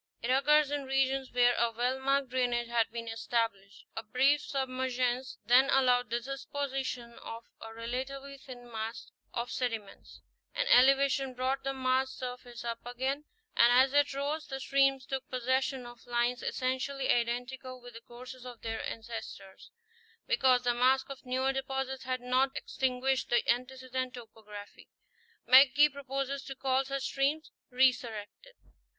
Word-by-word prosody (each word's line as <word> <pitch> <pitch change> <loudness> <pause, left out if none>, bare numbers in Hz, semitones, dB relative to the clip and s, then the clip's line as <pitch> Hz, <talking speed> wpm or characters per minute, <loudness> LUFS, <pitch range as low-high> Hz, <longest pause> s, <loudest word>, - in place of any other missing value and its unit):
It 235 - -2
occurs 290 +2 +4
in 290 -1 -2
regions 270 0 0
where 245 0 +4
a 235 0 +2
well 245 +3 -1
marked 275 0 +1
drainage 245 -1 0
had 230 -1 +2
been 230 0 -6
established; 225 -3 -2
a - - -3
brief 265 +6 +2
sub 270 -1 -2
mergence 255 0 -1
then 255 +4 +5
allowed 250 -2 +3
the 235 +1 0
deposition 270 -2 -4
of 230 +1 -8 0.2
a 225 - -8
relatively 265 +4 -5
thin 245 -2 -11
mask 225 +1 -5 0.2
of 240 0 -3
sediments; 225 -5 -5 0.3
an - - +1
elevation 270 - +4
brought 260 +2 -1
the 270 - -1
masked 260 0 0
surface 245 -1 -7
up 230 -1 -4
again, 260 +4 -3 0.3
and 235 +1 +6
as 260 +2 +5
it 290 0 +4
rose, 290 +3 -2
the 270 -1 -5
streams 275 -1 +2
took 265 -1 -4
possession 260 +1 0
of 240 0 -13
lines 240 +1 0
essen 255 0 -1
tially 275 0 -3
identical 250 +2 -2
with 245 0 -12
the 230 - -10
courses 250 +2 -11
of 245 -2 -10
their 225 -1 -3
ancestors, 220 -4 -8 0.6
because 260 - +3
the 245 -1 +2
mask 260 +3 +2
of 265 -1 -10
newer 260 +1 +1
deposits 265 0 -3
had 255 -1 -2
not 260 +2 +1
extinguished 260 0 -1
the 240 -1 +2
antecedent 255 +1 -2
topography. 215 -3 -11 0.6
McGee 275 +3 +7
proposes 275 0 -3
to 270 - -7
call 265 0 +1
such 275 0 -3
streams 285 +4 -1 0.2
"resurrected." 250 - 0
255 Hz, 150 wpm, -31 LUFS, 240-270 Hz, 0.6 s, McGee